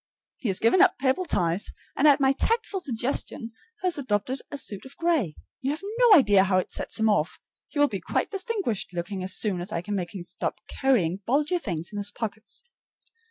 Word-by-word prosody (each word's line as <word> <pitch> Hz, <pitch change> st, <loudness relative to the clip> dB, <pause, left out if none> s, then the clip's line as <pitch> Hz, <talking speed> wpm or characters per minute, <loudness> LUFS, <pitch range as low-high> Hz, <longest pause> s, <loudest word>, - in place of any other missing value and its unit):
He 250 Hz, -, -3 dB
has 190 Hz, -, +2 dB
given 230 Hz, +11 st, +4 dB
up -, -, +5 dB
purple 270 Hz, +7 st, +1 dB
ties, 175 Hz, -, 0 dB, 0.2 s
and 295 Hz, -, +4 dB
at 290 Hz, -1 st, +6 dB
my 270 Hz, -1 st, +4 dB
tactful 450 Hz, -, 0 dB
suggestion 240 Hz, -3 st, -2 dB, 0.3 s
has 360 Hz, -5 st, +2 dB
adopted 250 Hz, +1 st, -1 dB
a 285 Hz, -, -5 dB
suit 205 Hz, -7 st, -4 dB
of 265 Hz, -, -12 dB
gray. 320 Hz, -, +1 dB, 0.3 s
You 265 Hz, -, -1 dB
have 305 Hz, +5 st, -3 dB, 0.2 s
no 485 Hz, -3 st, +7 dB
idea 205 Hz, -, +5 dB
how 185 Hz, -1 st, +2 dB
it 185 Hz, -, -1 dB
sets -, -, -2 dB
him 220 Hz, -, +3 dB
off. 205 Hz, -7 st, +1 dB, 0.3 s
He -, -, -9 dB
will 290 Hz, 0 st, +5 dB
be 195 Hz, -7 st, -5 dB
quite -, -, -1 dB
distinguished 385 Hz, -, -2 dB
looking 185 Hz, +2 st, -3 dB
as 185 Hz, 0 st, -1 dB
soon 195 Hz, -5 st, 0 dB
as 185 Hz, +4 st, -6 dB
I 170 Hz, -2 st, -2 dB
can 205 Hz, -, -4 dB
make 185 Hz, -1 st, -3 dB
him 185 Hz, -, -5 dB
stop 175 Hz, 0 st, -4 dB
carrying 195 Hz, -10 st, +1 dB
bulgy 300 Hz, +8 st, +2 dB
things 170 Hz, -, -4 dB
in 205 Hz, -, -3 dB
his 205 Hz, 0 st, +1 dB
pockets. 220 Hz, -, -6 dB
225 Hz, 205 wpm, -26 LUFS, 190-290 Hz, 0.3 s, no